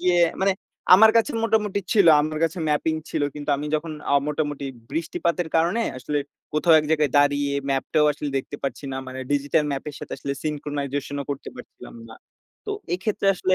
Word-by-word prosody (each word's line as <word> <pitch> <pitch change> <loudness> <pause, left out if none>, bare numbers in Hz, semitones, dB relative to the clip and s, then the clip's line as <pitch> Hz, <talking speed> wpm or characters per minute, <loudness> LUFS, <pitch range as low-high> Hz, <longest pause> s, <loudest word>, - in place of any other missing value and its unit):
গিয়ে 180 0 +3 0.2
মানে 195 0 +4 0.4
আমার 220 +3 +8
কাছে 230 +6 +3
মোটামুটি 210 -3 +1
ছিল, 200 -5 +5
আমার 155 +1 -2
কাছে 165 +2 -2
ম্যাপিং 150 +2 +1 0.2
ছিল। - - -1
কিন্তু 145 0 -4
আমি 150 +2 -4
যখন 155 +1 -2 0.2
অ - - +5
মোটামুটি 145 -2 -2 0.3
বৃষ্টিপাতের 170 +2 -1
কারণে 175 +8 +2 0.2
আসলে 145 +3 -2 0.3
কোথাও 160 +2 +4
এক - - -6
জায়গায় 150 -3 +2
দাঁড়িয়ে 145 0 +2 0.2
ম্যাপটাও 145 +3 +1
আসলে 145 0 -5
দেখতে 145 +2 -7
পারছি 140 +1 -4
না। - - -3
মানে 130 0 -7
ডিজিটাল 145 +2 +1
ম্যাপের 140 +2 -5
সাথে - - -8
আসলে 140 - -3
syncronization 145 -2 -3
ও - - -12
করতে 140 - -5
পারছিলাম - - -12
না। 110 - -11 0.5
তো - - -3 0.2
এক্ষেত্রে 195 +2 -2
আসলে 185 +1 +1
150 Hz, 175 wpm, -24 LUFS, 145-175 Hz, 0.5 s, আমার